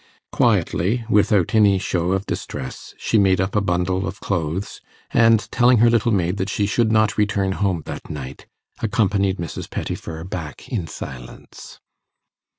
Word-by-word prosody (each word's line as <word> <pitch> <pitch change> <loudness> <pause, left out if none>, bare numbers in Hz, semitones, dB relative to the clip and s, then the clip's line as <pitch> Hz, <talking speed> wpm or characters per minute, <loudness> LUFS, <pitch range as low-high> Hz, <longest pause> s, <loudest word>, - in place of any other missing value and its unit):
Quietly, 110 +8 +1
without 100 -3 +3
any 105 -3 +5
show 90 -1 -1
of 95 +1 -1
distress, 65 - -6
she 110 - +1
made 95 -2 +3
up 95 +2 -1
a 105 - +3
bundle 95 0 0
of 95 +3 -6
clothes, 90 +1 -3 0.3
and, 115 -2 +5
telling 125 0 +4
her 115 +1 +5
little 115 0 +2
maid 90 -2 0
that 95 +1 -2
she 100 - 0
should 110 +2 +1
not 110 -1 +2
return 100 -2 +1
home 95 -4 -1
that - - -7
night, 70 -3 -7 0.3
accompanied 100 -4 +1
Mrs. 85 -4 -6
Pettifer 80 0 -5
back 85 -4 -7
in 100 -10 -2
silence. 60 -5 -10
95 Hz, 155 wpm, -21 LUFS, 90-105 Hz, 0.3 s, any